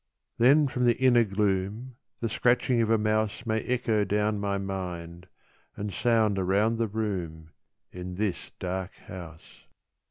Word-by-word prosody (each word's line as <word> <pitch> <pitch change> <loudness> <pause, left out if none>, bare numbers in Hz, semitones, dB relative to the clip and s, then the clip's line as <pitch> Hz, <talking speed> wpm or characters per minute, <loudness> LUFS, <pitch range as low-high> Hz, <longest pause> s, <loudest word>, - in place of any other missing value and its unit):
Then 140 +5 +6
from 125 -1 -1
the 120 -1 +3
inner 125 -2 +5
gloom 105 +4 -1 0.3
The 115 - 0
scratching 120 +1 +2
of 110 - +1
a 115 - +4
mouse 110 +1 0
May 110 -1 0
echo 120 -4 0
down 105 +1 0
my 100 -1 -1
mind 90 -3 -5 0.5
And 100 -1 -4
sound 110 0 +2
around 100 +5 +2
the 115 - +1
room 90 -7 -4 0.4
In 90 0 -7
this 100 -1 -2
dark 95 0 -4
house. 85 -3 -12
105 Hz, 145 wpm, -27 LUFS, 95-115 Hz, 0.5 s, Then